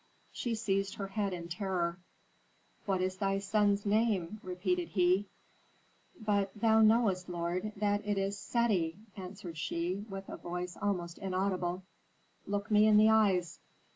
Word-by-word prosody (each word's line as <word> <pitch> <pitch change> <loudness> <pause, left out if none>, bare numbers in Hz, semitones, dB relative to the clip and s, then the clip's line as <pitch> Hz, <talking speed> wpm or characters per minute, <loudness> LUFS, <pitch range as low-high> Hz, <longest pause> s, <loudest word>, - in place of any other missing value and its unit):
She 235 -2 -2
seized 195 -3 -1
her 195 -1 -5
head 200 -1 -1
in 170 -2 -5
terror. 175 -1 -2 0.9
"What 190 -2 +1
is 185 0 -1
thy 195 0 +1
son's 200 +1 +1
name?" 210 -2 +1
repeated 180 -1 -1
he. 185 +1 +2 0.9
"But 205 -3 +1
thou 220 +1 +4
knowest, 215 -5 +3
lord, 175 +4 -2
that 205 0 0
it 205 -1 -1
is 195 +1 0
Seti," 195 -6 0 0.2
answered 185 -4 -8
she, 170 +3 -1
with 195 0 -7
a - - -7
voice 180 +1 -5
almost 175 -4 -2
inaudible. 185 -1 -1 0.6
"Look 205 +2 -2
me 210 +1 +6
in 215 -1 +6
the 215 +1 +7
eyes." 195 -6 +2
195 Hz, 140 wpm, -32 LUFS, 180-210 Hz, 0.9 s, the